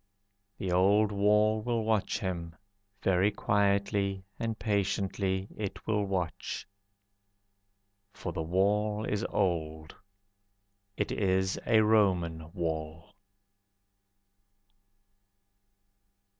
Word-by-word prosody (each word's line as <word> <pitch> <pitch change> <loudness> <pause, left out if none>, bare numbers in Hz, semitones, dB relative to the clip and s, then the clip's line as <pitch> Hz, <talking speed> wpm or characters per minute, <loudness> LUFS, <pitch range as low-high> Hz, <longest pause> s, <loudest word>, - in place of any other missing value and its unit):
The 95 - -3
old 100 +4 +4
wall 105 +2 +3
will 115 0 -1
watch 110 -2 +1
him, 85 -4 -4 0.5
Very 95 +1 +3
quietly 100 -1 +1 0.2
and 115 -2 -2
patiently 100 -2 -1
it 105 -3 -5
will 105 -2 +1
watch. 95 -2 -3 1.4
For 90 - -6
the 80 - -3
wall 105 +5 +1
is 105 +1 -1
old, 80 -5 -1 1.0
It - - -1
is 95 -1 +1
a 110 -2 +5
Roman 90 -7 +2
wall. 80 -1 -4
100 Hz, 85 wpm, -30 LUFS, 90-105 Hz, 1.4 s, a